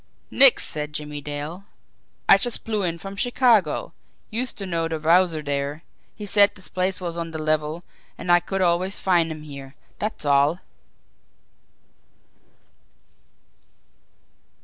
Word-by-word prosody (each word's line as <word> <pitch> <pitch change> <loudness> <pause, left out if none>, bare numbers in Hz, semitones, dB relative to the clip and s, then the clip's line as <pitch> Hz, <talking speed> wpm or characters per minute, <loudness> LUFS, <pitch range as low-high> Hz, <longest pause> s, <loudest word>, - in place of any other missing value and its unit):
"Nix!" 270 -2 +6
said 150 0 -4
Jimmie 150 -1 -5
Dale. 150 +6 -6 0.6
"I 195 - +7
just 240 +3 -3
blew 215 -2 -2
in 170 -3 -1
from 195 +3 -8
Chicago. 230 - +2 0.4
Used 245 +3 -2
to 195 - -4
know 165 -3 -1
de 165 -1 -3
Wowzer 165 0 +3
dere. 145 +2 -3 0.3
He 210 - -7
said 205 +1 +5
dis 185 - -10
place 185 +1 -1
was 175 -2 -4
on 170 -1 -4
de 160 - -6
level, 155 +1 -1 0.3
an' 175 - -2
I 175 - +7
could 190 +2 -2
always 180 +3 +1
find 170 -3 +2
him 155 -1 -8
here, 140 -2 -10 0.2
dat's 210 -6 -2
all." 145 +3 +3
170 Hz, 135 wpm, -23 LUFS, 150-195 Hz, 0.6 s, I